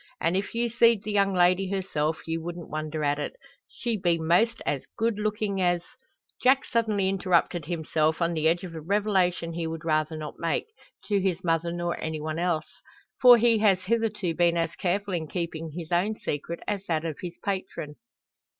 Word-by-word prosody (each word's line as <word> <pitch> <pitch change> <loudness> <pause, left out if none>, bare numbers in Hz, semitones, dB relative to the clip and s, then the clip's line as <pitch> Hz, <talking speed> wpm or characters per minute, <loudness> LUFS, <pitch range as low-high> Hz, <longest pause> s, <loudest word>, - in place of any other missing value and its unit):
An' 165 +2 +1
if 200 +4 -2
you 235 +1 +2
seed 230 -2 +4
the 215 - -3
young 200 -1 +3
lady 185 +1 +3
herself, 165 -5 -1
ye 165 - -2
wouldn't 170 +1 -6
wonder 155 0 -3
at 145 0 +1
it. - - -4 0.3
She 235 -2 -3
be 175 -3 +2
most 175 +9 +2
as 140 -2 -2
good 225 -1 0
looking 210 -2 -1
as 175 -1 +2 0.3
" - - -27
Jack 260 +1 +4
suddenly 215 -4 +1
interrupted 180 -3 +1
himself 160 -1 0
on 170 0 +1
the 160 -1 +1
edge 170 +2 +2
of 180 -2 -7
a 160 - -6
revelation 185 -2 +1
he 165 0 -3
would 165 0 -6
rather 155 0 0
not 155 -1 -7
make, 165 -1 0 0.4
to 205 -2 +1
his 190 -1 -1
mother 165 0 +1
nor 175 0 -3
any 160 -1 -3
one 155 +1 -3
else. 170 -3 -2 0.4
For 245 -1 +9
he 230 -1 +4
has 195 -3 +4
hitherto 215 -4 0
been 170 +1 +2
as 165 0 0
careful 195 +2 -1
in 160 -3 -2
keeping 165 -1 -4
his 165 +2 -8
own 190 +5 +1
secret 155 +3 -4
as 200 -2 -2
that 160 -1 0
of 160 -3 -3
his 175 -1 -6
patron. 190 -6 -4
175 Hz, 195 wpm, -27 LUFS, 165-200 Hz, 0.4 s, For